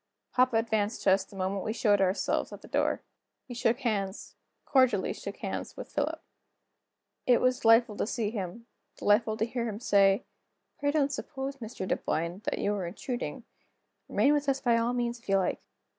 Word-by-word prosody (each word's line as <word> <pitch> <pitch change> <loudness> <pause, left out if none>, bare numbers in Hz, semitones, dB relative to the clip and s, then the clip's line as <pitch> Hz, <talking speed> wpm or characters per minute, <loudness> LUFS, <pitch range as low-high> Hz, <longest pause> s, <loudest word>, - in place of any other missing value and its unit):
Papa 255 -1 +3
advanced 220 -1 0
to 195 - +5
us 190 0 +4
the 195 - -16
moment 190 +1 -2
we 220 - -2
showed 205 -3 +3
ourselves 190 +1 +1
at - - -10
the - - -11
door. - - 0 0.4
He 250 - -7
shook 240 +2 +1
hands 205 -5 -2 0.3
cordially 255 -8 +3
shook - - -7
hands - - -5
with - - -8
Philip. - - -1 1.1
It 245 -1 +6
was 255 0 +2
delightful 225 -1 +5
to - - -1
see 220 -2 -1
him, 205 +1 -5 0.3
delightful 215 +1 +2
to 220 - +1
hear 235 0 -2
him 210 -1 -5
say: 200 -1 +4 0.5
"Pray 285 - +1
don't 285 -1 +2
suppose, 275 0 -5
Mr. 220 -6 -6
Dunboyne, 170 +3 -1
that - - -1
you 205 - 0
are 190 -4 -2
intruding; 240 +7 -5 0.7
remain 285 - +4
with 290 -1 +1
us 270 0 +1
by 240 -3 +3
all 230 +1 +1
means 240 -1 -1
if 230 - -16
you 195 - +4
like." 190 - 0
225 Hz, 185 wpm, -29 LUFS, 200-250 Hz, 1.1 s, It